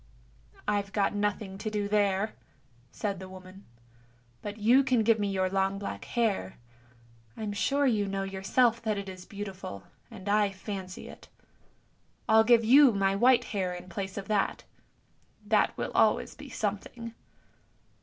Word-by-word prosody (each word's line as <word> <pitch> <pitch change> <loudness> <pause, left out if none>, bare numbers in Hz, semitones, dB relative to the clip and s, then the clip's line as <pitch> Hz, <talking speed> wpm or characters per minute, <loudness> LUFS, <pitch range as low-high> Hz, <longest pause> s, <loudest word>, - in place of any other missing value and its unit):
" - - -29 0.3
I've 205 -1 0
got 200 -1 +1
nothing 205 -1 -2
to 215 - -3
do 210 -1 -2
there," 205 0 +1 0.6
said 200 -3 -3
the 190 0 -9
woman; 185 +1 -12 0.4
" 120 0 -34
but 205 0 -6
you 240 +6 +5
can 250 -4 +2
give 225 0 +3
me 205 - 0
your 190 -1 +1
long 195 +1 0
black 200 - -6
hair; 210 - -1 0.8
I'm 210 -2 -3
sure 280 +7 +1
you 215 -6 +2
know 195 0 -2
yourself 210 +5 +1
that 215 -2 -1
it 200 0 -5
is 185 -1 -9
beautiful, 195 - -7 0.3
and 190 - -11
I 205 -1 +2
fancy 190 -1 -7
it. - - -13 1.0
I'll 220 0 +6
give 230 0 +5
you 265 +1 +7
my 195 -1 +1
white 245 +4 +5
hair 185 -3 -2
in 180 +1 -10
place 190 +3 -5
of 200 - -4
it, 205 -2 0 0.8
that - - +2
will - - -3
always - - +2
be - - -11
something." 230 -1 -4
200 Hz, 160 wpm, -29 LUFS, 190-220 Hz, 1.0 s, you